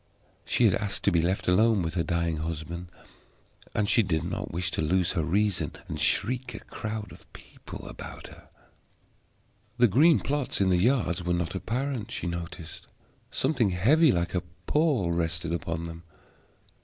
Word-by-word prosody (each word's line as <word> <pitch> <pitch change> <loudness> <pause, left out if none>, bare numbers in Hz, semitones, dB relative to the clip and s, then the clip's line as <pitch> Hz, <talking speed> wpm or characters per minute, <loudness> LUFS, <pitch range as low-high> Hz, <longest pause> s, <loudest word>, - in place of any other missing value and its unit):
She - - +3
had - - +5
asked 100 -2 -2
to 100 - +3
be 85 -2 +3
left 90 +4 -1
alone 105 +2 +4
with 80 - -2
her 90 - +1
dying 85 -1 0
husband, 80 +2 -5 0.9
and 105 -1 +1
she 115 - +5
did 85 -6 0
not 85 - -4
wish 90 +1 -2
to - - -1
lose 90 +3 +2
her 85 -4 0
reason 100 +4 +1
and 75 - -5
shriek 125 - +1
a - - -6
crowd 110 -2 -5
of - - -15
people - - -10
about - - -9
her. - - -14 1.3
The 120 -1 +6
green 150 - +5
plots 145 -2 -1
in 95 -1 +3
the 90 -1 +3
yards 100 -7 +2
were 90 0 +1
not 85 -1 -2
apparent, 120 +4 -2
she - - -4
noticed. 85 -1 -6 0.4
Something 130 -7 +1
heavy, 130 - +4
like 85 0 -1
a 90 - +1 0.2
pall, 145 - +2
rested 85 0 -1
upon 85 -1 -3
them. 85 0 -7
90 Hz, 165 wpm, -28 LUFS, 85-110 Hz, 1.3 s, The